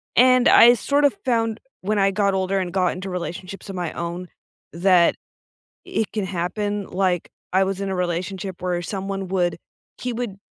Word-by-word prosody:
And 255 0 +6
I 240 +1 +8
sort 285 +4 +1
of 285 - +4
found, 225 -3 +1 0.2
when 210 +2 0
I 195 0 +3
got 200 0 +1
older 190 0 0
and 180 -2 -3
got 185 -1 +2
into 185 +1 -6
relationships 180 +2 -6
of 195 - -5
my 175 -3 -3
own, 170 +1 -5 0.5
that 175 0 +4 0.7
it 220 - -2
can 210 -3 -2
happen, 200 +3 -2
like, 180 -2 0 0.2
I 190 +1 +4
was 195 0 -2
in 195 - -2
a 190 - -2
relationship 180 +1 -3
where 180 -1 -1
someone 195 +1 -4
would 180 -3 0 0.4
he 250 -1 -3
would 230 -4 -4
190 Hz, 175 wpm, -22 LUFS, 180-205 Hz, 0.7 s, I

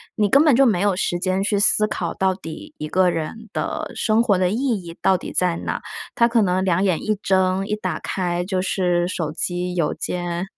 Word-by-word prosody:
你 210 -2 +1
根 280 +6 +5
本 295 -5 +5
就 270 +2 +5
没 210 -8 +2
有 200 0 +2
时 175 -1 -1
间 185 +1 0
去 205 0 +1
思 210 +1 +5
考 - - -3
到 190 0 +1
底 165 -4 -9
一 155 - -5
个 185 +2 +3
人 175 +7 -5
的 - - -3
生 220 0 +2
活 200 -5 +2
的 180 -1 +2
意 200 - -1 0.3
义 170 -1 -10
到 190 - +3
底 - - -8
在 180 -2 +1
哪？ - - -4 0.3
他 235 - +4
可 235 -1 +2
能 185 -1 +1
两 185 0 +1
眼 185 -5 +1
一 215 0 0
睁、 190 0 +1
一 210 - -1
打 215 - -3
开 175 -2 -2
就 185 -1 -1
是 180 -2 0
手 170 -4 -3
机 180 +2 -2
邮 170 -4 0
件。 175 0 -3
185 Hz, 240 characters per minute, -21 LUFS, 175-205 Hz, 0.3 s, 根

